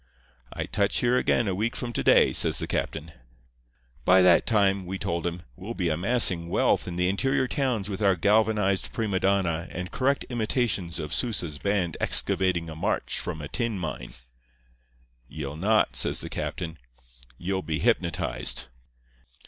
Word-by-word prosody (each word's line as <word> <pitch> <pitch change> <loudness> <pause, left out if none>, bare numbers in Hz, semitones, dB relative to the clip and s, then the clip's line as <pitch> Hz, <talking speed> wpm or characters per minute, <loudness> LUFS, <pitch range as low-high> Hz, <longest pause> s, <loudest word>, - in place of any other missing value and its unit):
"'I - - -3
touch - - 0
here 120 +1 +2
again 120 -2 +2
a 95 - 0
week 110 +5 -1
from 120 -1 -4
to - - -2
day,' - - +5
says - - +2
the - - -2
captain. 80 +1 -3 0.9
"'By 90 +4 +5
that 90 -2 +5
time,' 100 -4 +2
we 95 +2 -3
told 85 -1 -2
him, 85 0 -5
'we'll 110 - -7
be 90 -3 0
amassing 90 0 +2
wealth - - +1
in 90 - -5
the 90 +1 +1
interior 130 +7 +1
towns 125 -8 -1
with 100 0 -5
our 100 -2 +4
galvanized 105 0 +2
prima 105 -5 -1
donna 95 -4 +1
and 90 0 -6
correct 135 +1 +1
imitations 110 -6 -1
of 75 -1 -5
Sousa's 85 -7 -1
band 100 -5 -1
excavating 90 -3 +2
a 80 - -7
march 80 - -2
from 80 -4 -5
a - - -5
tin 115 - -2
mine.' 80 -4 -6 1.1
"'Ye'll 75 +1 -6
not,' 105 +7 +2
says - - 0
the - - -6
captain. 80 -3 -5 0.6
'Ye'll 95 +2 -2
be 80 -3 -2
hypnotized. 90 - 0
95 Hz, 160 wpm, -26 LUFS, 85-110 Hz, 1.1 s, day